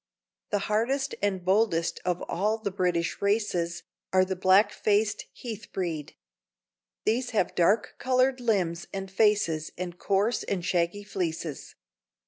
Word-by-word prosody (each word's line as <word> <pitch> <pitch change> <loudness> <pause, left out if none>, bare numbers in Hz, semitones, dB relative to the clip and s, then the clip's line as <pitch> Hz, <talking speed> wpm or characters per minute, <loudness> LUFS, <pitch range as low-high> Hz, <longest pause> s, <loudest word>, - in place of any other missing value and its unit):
The 205 - +1
hardiest 265 +6 0
and 190 -3 -1
boldest 185 -4 +2
of 180 -1 -1
all 210 +5 0
the 215 -3 -3
British 180 -3 0
races 200 -5 0 0.3
are 185 0 +4
the 190 0 -2
black 190 +3 +5
faced 210 0 +1
Heath 220 -3 -8
breed; 165 -6 -3 0.9
these 245 +3 +1
have 185 - +2
dark 200 +5 +2
colored 255 +1 +2
limbs 185 -8 0
and 195 -1 -5
faces 195 -7 +2
and 175 -1 -5
coarse 205 +4 +1
and 180 -3 -3
shaggy 175 +3 0
fleeces. 165 -6 -4
195 Hz, 130 wpm, -28 LUFS, 175-215 Hz, 0.9 s, black